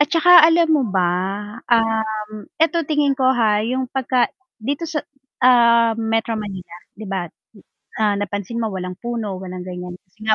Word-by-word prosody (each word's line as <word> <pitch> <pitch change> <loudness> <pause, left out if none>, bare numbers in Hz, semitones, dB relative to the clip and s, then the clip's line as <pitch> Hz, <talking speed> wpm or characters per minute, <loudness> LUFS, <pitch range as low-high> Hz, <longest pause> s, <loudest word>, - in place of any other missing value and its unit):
at 295 - +4
tsaka 335 +2 +3
alam 330 0 +4
mo 295 -3 +3
ba? 180 -1 +2 0.6
um, 220 -2 0 0.3
eto 330 0 +2
tingin 290 -2 +1
ko 265 - -1
ha, 215 -3 +1
'yung 255 +2 -2
pag 255 -1 0 0.3
dito 285 +8 -3
sa, 315 -2 -2 0.4
ah, 235 -2 +5
sa - - -9
Metro 225 0 -1
Manila, 190 -4 -8 0.2
'di 215 0 -9
ba. 190 -2 -3 0.7
Ah, 210 -1 +2
napansin 205 +2 -4
mo 220 - -2
walang 185 -1 -5
puno, 230 -5 -4
walang 180 -1 -7
ganyan 180 -1 -7
kasi 215 +4 -16
nga 220 0 +4
225 Hz, 170 wpm, -20 LUFS, 205-260 Hz, 0.7 s, ah